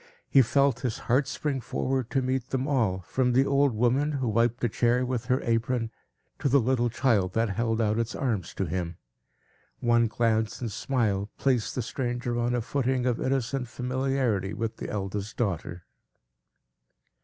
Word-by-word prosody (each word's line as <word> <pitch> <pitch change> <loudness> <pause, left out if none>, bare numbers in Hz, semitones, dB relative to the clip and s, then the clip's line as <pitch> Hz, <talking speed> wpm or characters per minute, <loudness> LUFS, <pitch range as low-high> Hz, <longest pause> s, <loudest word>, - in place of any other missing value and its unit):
He 135 - +6
felt 140 +1 +2
his 125 -4 -2
heart 130 +3 +1
spring 135 -1 -2
forward 130 +1 -2
to 135 - 0
meet 130 0 -1
them 130 +1 -1
all, 110 -10 +1
from 125 +7 0
the 130 +2 +4
old 140 0 +3
woman, 130 +6 +2
who 130 -3 -1
wiped 115 +2 +1
a - - +4
chair 120 +3 +2
with 125 -2 -2
her 130 +1 +1
apron, 115 0 0 0.5
to 140 - +1
the 140 +2 +5
little 120 0 +1
child 105 -6 +1
that 115 -2 +1
held 115 +2 0
out 110 0 +1
its 115 0 -2
arms 110 -10 -2
to 95 - -1
him. 85 0 -3 0.8
One 120 -1 +3
glance 110 -1 0
and 115 -4 -3
smile 105 -6 0
placed 125 -5 +1
the 125 - -1
stranger 120 0 -2
on 120 +1 +1
a 120 - 0
footing 130 +1 0
of 125 -2 0
innocent 130 -1 -1
familiarity 125 -5 -1
with 115 +1 -3
the - - -5
eldest 100 +1 -4
daughter. 90 -5 -2
120 Hz, 170 wpm, -27 LUFS, 110-130 Hz, 0.8 s, He